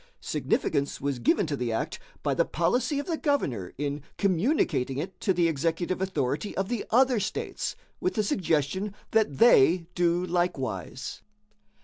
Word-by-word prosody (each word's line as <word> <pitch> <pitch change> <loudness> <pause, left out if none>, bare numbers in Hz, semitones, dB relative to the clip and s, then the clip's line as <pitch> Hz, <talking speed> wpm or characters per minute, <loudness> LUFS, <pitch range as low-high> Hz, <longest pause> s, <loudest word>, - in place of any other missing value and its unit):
Significance 140 0 -1
was 140 -2 -2
given 175 - +3
to 150 -2 -2
the 125 -3 -2
act 110 - -2 0.2
by - - +1
the - - +3
policy 245 - 0
of 285 - -2
the 330 -3 -1
governor 125 - 0
in 145 +1 -2 0.2
communicating 185 - +1
it 180 +7 -5
to 195 - +1
the 175 -2 +3
executive 165 +4 -1
authority 150 -2 -1
of 195 0 -1
the 240 -3 -1
other 255 0 +4
states, 205 +2 -3 0.2
with 365 - -1
the 215 - +2
suggestion 190 +1 0 0.2
that 215 -11 +2
they 175 - +6
do 175 0 +2
likewise. 135 - -2
175 Hz, 150 wpm, -27 LUFS, 140-205 Hz, 0.2 s, they